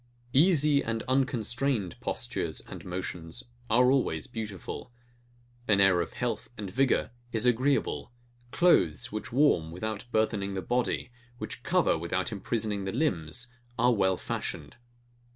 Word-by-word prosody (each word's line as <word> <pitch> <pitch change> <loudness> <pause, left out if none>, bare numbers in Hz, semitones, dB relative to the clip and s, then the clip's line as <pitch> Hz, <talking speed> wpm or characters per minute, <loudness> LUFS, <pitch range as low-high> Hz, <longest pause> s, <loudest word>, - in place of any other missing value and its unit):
Easy 150 -2 +5
and 115 -1 -2
unconstrained 130 - 0
postures - - -2
and - - -10
motions 90 +3 -5 0.3
are 125 +3 +5
always 105 - +1
beautiful: 110 -1 -6 0.8
An 105 -2 +4
air 95 -3 +5
of 85 - -5
health 120 -2 -3
and 100 -3 -5
vigour 130 -2 +2 0.2
is 115 +1 0
agreeable: 125 0 +1 0.4
Clothes 120 - +3
which 110 +6 -5
warm, 125 - +3
without 110 +6 -4
burthening 105 -3 0
the 95 - -3
body; 125 0 -1 0.3
which - - -6
cover, - - +2
without - - -1
imprisoning 105 -4 -2
the 95 - -2
limbs, 110 - -1 0.3
are 120 +2 +4
well 95 -3 +2
fashioned. 75 +1 -4
110 Hz, 130 wpm, -29 LUFS, 95-125 Hz, 0.8 s, Easy